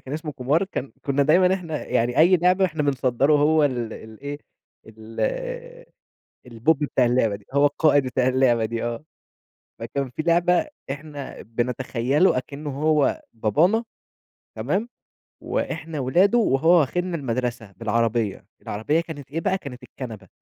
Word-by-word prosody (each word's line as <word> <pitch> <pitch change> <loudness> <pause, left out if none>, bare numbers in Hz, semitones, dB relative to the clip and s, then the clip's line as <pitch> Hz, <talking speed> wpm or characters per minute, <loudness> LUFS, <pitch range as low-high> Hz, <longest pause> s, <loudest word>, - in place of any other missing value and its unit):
كان 135 +3 -7
إسمه 155 -1 -5
كومار 140 +9 +1
كان 140 - -5
كُنا 140 0 +1
دايمًا 180 +6 +4
إحنا 165 -5 -5
يعني، 120 +2 0
أي 175 +4 +6
لعبة 180 +2 +3
إحنا 160 -4 -1
بنصدّره 135 0 +1
هو 150 +1 +4
ال 120 -5 -1
الإيه 140 +7 -8 0.5
ال 110 0 -10 1.3
البوب 125 +6 +1
بتاع 135 -3 +2
اللعبة 120 -4 +2
دي، 100 - -14
هو 140 +1 +4
القائد 145 -1 +3
بتاع 130 0 0
اللعبة 125 -3 +3
دي 115 +1 -3
آه. 120 +3 -3 0.8
فكان 130 +4 -3
في 125 - -4
لعبة 175 - +2 0.2
إحنا 145 -1 -7
بنتخيله 125 - 0
أكنه 145 +3 -5
هو 155 -2 +2
بابانا 155 - +2 0.7
تمام، 220 +5 -1 0.5
وإحنا 160 -2 -3
ولادُه 180 - +3
وهو 160 - +2
واخذنا 175 +4 -1
المدرسة 120 -5 -3
بالعربية، 115 0 -1 0.2
العربية 145 +11 -1
كانت 145 -5 -9
إيه 165 - -2
بقى 190 +2 +1
كانت 135 -8 -10
الكنبة. 110 -7 -9
140 Hz, 140 wpm, -23 LUFS, 120-160 Hz, 1.3 s, أي